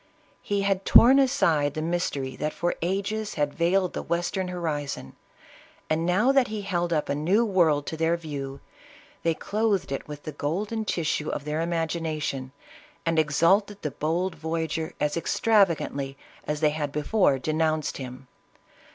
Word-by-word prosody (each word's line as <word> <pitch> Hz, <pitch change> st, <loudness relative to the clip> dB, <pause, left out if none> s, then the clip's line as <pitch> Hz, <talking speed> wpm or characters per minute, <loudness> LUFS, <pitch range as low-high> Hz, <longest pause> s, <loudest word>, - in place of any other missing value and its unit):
He 200 Hz, -1 st, -1 dB
had 195 Hz, -1 st, +1 dB
torn 255 Hz, +7 st, +7 dB
aside 165 Hz, -, +2 dB
the 155 Hz, -, -2 dB
mystery 145 Hz, -6 st, -2 dB
that 150 Hz, 0 st, -2 dB
for 175 Hz, -, 0 dB
ages 200 Hz, +4 st, -2 dB
had 145 Hz, -2 st, 0 dB
veiled 180 Hz, +2 st, +1 dB
the -, -, -3 dB
western 175 Hz, +2 st, -1 dB
horizon, 150 Hz, -, -4 dB, 0.8 s
and 165 Hz, +2 st, +1 dB
now 210 Hz, +9 st, +4 dB
that 270 Hz, -2 st, +4 dB
he 215 Hz, -1 st, -4 dB
held 175 Hz, -3 st, -1 dB
up 155 Hz, -3 st, +1 dB
a -, -, 0 dB
new 180 Hz, +11 st, +2 dB
world 165 Hz, -8 st, +3 dB
to 160 Hz, -, -5 dB
their 165 Hz, +1 st, +2 dB
view, 140 Hz, -4 st, -6 dB, 0.6 s
they 165 Hz, -1 st, +1 dB
clothed 205 Hz, -5 st, 0 dB
it 135 Hz, -, -4 dB
with 150 Hz, -1 st, -8 dB
the 155 Hz, -, -5 dB
golden 200 Hz, +10 st, -2 dB
tissue 155 Hz, -5 st, -1 dB
of 145 Hz, -, -4 dB
their 150 Hz, +1 st, -1 dB
imagination, 160 Hz, -5 st, -2 dB, 0.5 s
and 165 Hz, -1 st, +2 dB
exalted 180 Hz, +7 st, +2 dB
the 150 Hz, -, -2 dB
bold 170 Hz, +6 st, -1 dB
voyager 160 Hz, 0 st, -3 dB
as 150 Hz, 0 st, 0 dB
extravagantly 165 Hz, -8 st, +1 dB, 0.3 s
as 150 Hz, 0 st, -2 dB
they 150 Hz, -1 st, +4 dB
had 150 Hz, -2 st, -3 dB
before 150 Hz, 0 st, +2 dB
denounced 155 Hz, +2 st, 0 dB
him. 130 Hz, 0 st, -8 dB
165 Hz, 155 wpm, -26 LUFS, 150-190 Hz, 0.8 s, torn